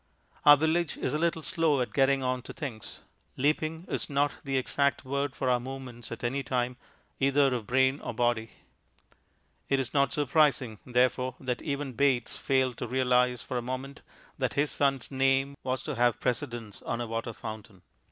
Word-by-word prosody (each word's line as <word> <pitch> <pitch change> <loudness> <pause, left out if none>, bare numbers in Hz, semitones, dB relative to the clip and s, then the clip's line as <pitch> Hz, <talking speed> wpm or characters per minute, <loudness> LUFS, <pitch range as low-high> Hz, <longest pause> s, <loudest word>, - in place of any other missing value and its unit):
Our 145 0 +11
village 160 +1 +1
is 130 - -2
a 150 - 0
little 165 -1 0
slow 150 -1 +2
at 125 - -2
getting 135 -1 +3
on 130 0 0
to - - -6
things; 130 -10 -7 0.4
"leaping" 155 +4 0
is - - -2
not 145 0 +1
the 135 -1 -1
exact 140 +1 +1
word 140 0 -2
for 130 - -2
our 125 -1 +3
movements 125 -2 -8
at 115 - -7
any 130 +4 0
time, 125 -2 -1 0.4
either 140 0 +3
of 115 -4 -3
brain 130 +2 +3
or - - -5
body. 120 -2 0 1.2
It 135 - +3
is 130 - -3
not 140 -3 +3
surprising, 140 -6 +2
therefore, 125 +1 +2
that 125 -2 -3
even 140 -3 -3
Bates 130 -2 +1
failed 130 -2 +1
to 120 - -3
realize 125 -1 +2
for 125 - -2
a - - -4
moment 130 +3 -5 0.4
that - - -1
his 145 +1 +1
son's 135 -3 0
name 135 +1 +2
was 130 0 -2
to 150 - -3
have 120 -2 +2
precedence 120 -3 -3
on 120 - -3
a 120 - -2
water 115 +1 -3
fountain. 110 -4 -9
130 Hz, 180 wpm, -29 LUFS, 120-140 Hz, 1.2 s, Our